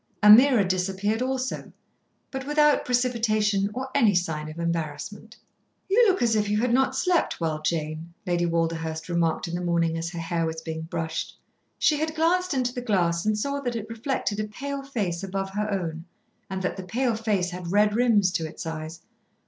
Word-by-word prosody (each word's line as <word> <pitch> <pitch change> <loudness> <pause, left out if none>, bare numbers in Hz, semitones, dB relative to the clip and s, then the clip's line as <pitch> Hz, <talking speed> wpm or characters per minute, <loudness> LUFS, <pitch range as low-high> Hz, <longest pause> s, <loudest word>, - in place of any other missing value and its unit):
Ameerah 220 0 +8
disappeared 195 +4 0
also, 260 0 -2 0.6
but 265 0 -5
without 295 0 +3
precipitation 220 -5 +1
or 260 +4 -5
any 230 -8 +4
sign 160 -4 -1
of 155 - -9
embarrassment. 170 +7 -4 0.5
"You 445 +5 +5
look 385 -8 +2
as 230 -2 +3
if 210 -1 +1
you 210 - +1
had 240 +1 +1
not 265 +1 +2
slept 355 +4 +1
well, 160 -2 -1
Jane," 155 +1 -2
Lady 175 -1 +1
Walderhurst 165 -1 -2
remarked 170 0 0
in 170 - -6
the 175 - -2
morning 170 -2 +1
as 165 +1 -3
her 175 - -8
hair 165 0 -1
was 160 0 -4
being 160 -1 -4
brushed. 160 -2 -4 0.4
She 300 - +3
had 315 +1 -2
glanced 345 +1 +2
into 250 -2 0
the 250 - -4
glass 180 -5 +1
and 215 -1 +2
saw 280 +6 -1
that 245 -4 -3
it 220 -1 -5
reflected 230 -2 -2
a 215 - -1
pale 280 +6 -5
face 205 -11 -3
above 195 0 -3
her 210 +2 -2
own, 170 -5 -3 0.4
and 190 -1 -4
that 180 - -2
the 190 - -5
pale 235 +7 0
face 205 -5 0
had 175 -1 -6
red 210 +1 +3
rims 220 -6 +3
to 165 -3 -2
its 160 - -8
eyes. 160 0 -6
205 Hz, 190 wpm, -26 LUFS, 170-245 Hz, 0.6 s, Ameerah